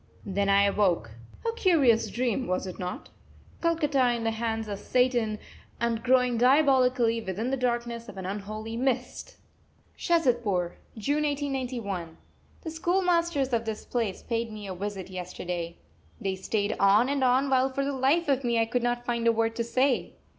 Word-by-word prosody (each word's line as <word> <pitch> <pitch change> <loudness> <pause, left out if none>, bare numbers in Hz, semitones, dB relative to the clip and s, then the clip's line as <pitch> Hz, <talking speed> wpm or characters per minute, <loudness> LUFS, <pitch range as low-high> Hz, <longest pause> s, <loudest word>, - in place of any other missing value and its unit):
Then 200 0 0
I 200 0 +5
awoke. 195 - +1 0.4
A 455 - +1
curious 285 - +3
dream, 250 0 -1
was 185 +1 -1
it 185 +1 -7
not? 180 -1 -5 0.5
Calcutta 295 -7 +2
in 230 - -4
the 225 - +1
hands 225 -1 -2
of 200 -1 -4
Satan 240 -4 +1 0.4
and 235 -1 0
growing 250 -1 +3
diabolically, 255 -3 +4
within 220 +5 -3
the - - +2
darkness 235 -2 -2
of 195 - -10
an 190 - -5
unholy 215 +3 -5
mist! 255 +1 -2 0.6
SHAZADPUR, 235 - +1 0.2
June 285 +8 0
1891. 255 - -3 0.5
The 320 - -5
schoolmasters 340 -5 +1
of 230 -1 +1
this 220 -1 -5
place 230 -6 -2
paid 230 -1 -2
me 210 -1 -8
a 190 - -5
visit 190 0 -5
yesterday. 180 -2 -5 0.4
They 195 -1 -2
stayed 205 +2 -1
on 200 +5 +5
and 275 -1 0
on, 255 +2 +3
while 260 0 +3
for 275 +1 -2
the 280 - -1
life 275 +6 +2
of 275 -1 +1
me 235 -1 +1
I 225 - +3
could 240 +2 -1
not 240 0 -1
find 235 -1 0
a - - +7
word 225 0 0
to 235 - 0
say. 255 +2 +1
235 Hz, 170 wpm, -27 LUFS, 205-265 Hz, 0.6 s, a